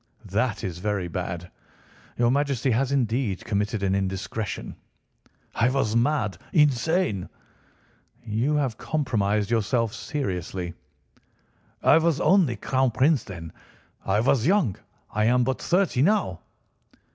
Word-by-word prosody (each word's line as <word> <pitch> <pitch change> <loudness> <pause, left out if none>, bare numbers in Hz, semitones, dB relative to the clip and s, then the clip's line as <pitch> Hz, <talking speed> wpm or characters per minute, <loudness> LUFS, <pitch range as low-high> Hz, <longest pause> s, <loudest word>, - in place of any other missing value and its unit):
That 105 +3 -1
is 90 -2 -4
very 100 -2 -1
bad! 90 0 -5 0.7
Your 120 0 +3
Majesty 140 -2 +1
has 130 +4 +1
indeed 120 -6 0
committed 105 -1 -1
an 95 -1 +1
indiscretion." 95 +2 -3 0.8
"I 120 +2 +2
was 130 -5 0
mad—insane." 130 - +1 1.0
"You 120 +7 0
have 135 -7 -1
compromised 110 -8 0
yourself 115 0 +1
seriously." 95 - -4 1.1
"I 160 - +6
was 165 -3 +1
only 180 -11 +3
Crown 130 +1 +1
Prince 135 +3 +2
then. 80 -4 -9 0.5
I 100 +2 +1
was 125 +1 +2
young. 175 - +2 0.4
I 105 +1 +1
am 125 +2 +4
but 130 +1 -1
thirty 180 -8 +1
now." 170 - +2
115 Hz, 115 wpm, -25 LUFS, 100-140 Hz, 1.1 s, I